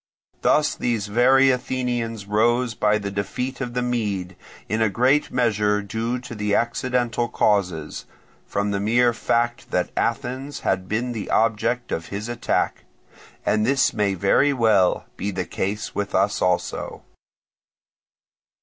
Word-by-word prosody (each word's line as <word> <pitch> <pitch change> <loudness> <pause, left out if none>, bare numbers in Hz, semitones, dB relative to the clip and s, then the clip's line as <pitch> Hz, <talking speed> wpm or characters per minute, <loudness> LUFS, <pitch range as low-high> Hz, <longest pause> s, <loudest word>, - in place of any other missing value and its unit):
Thus 150 -1 +3
these 115 -4 -1
very 130 +5 +4
Athenians 120 -4 -2
rose 115 +4 +2
by 105 -2 +2
the 100 -1 -4
defeat 125 +7 -3
of 120 -2 -4
the 125 - 0
Mede, 105 -7 -2 0.3
in 110 +1 -1
a 110 - +3
great 130 +8 +2
measure 105 -4 +1
due 115 +4 -2
to 105 -4 -3
accidental 120 0 0
causes, 90 -9 0 0.4
from 100 0 -1
the 100 - -1
mere 120 +4 +3
fact 120 +1 -1
that - - -1
Athens 135 +3 -2
had 95 0 -1
been 120 +3 -1
the 110 -4 -5
object 115 +2 +1
of 80 0 -3
his 105 +3 -5
attack; 120 0 -1 0.6
and 105 0 +2
this 130 +2 +2
may 100 -2 0
very 100 +10 +3
well 110 -7 +3
be 100 - -2
the 95 -2 -3
case 105 +5 -3
with 100 0 -3
us 100 +2 +1
also. 90 -1 -1
115 Hz, 140 wpm, -23 LUFS, 100-125 Hz, 0.6 s, very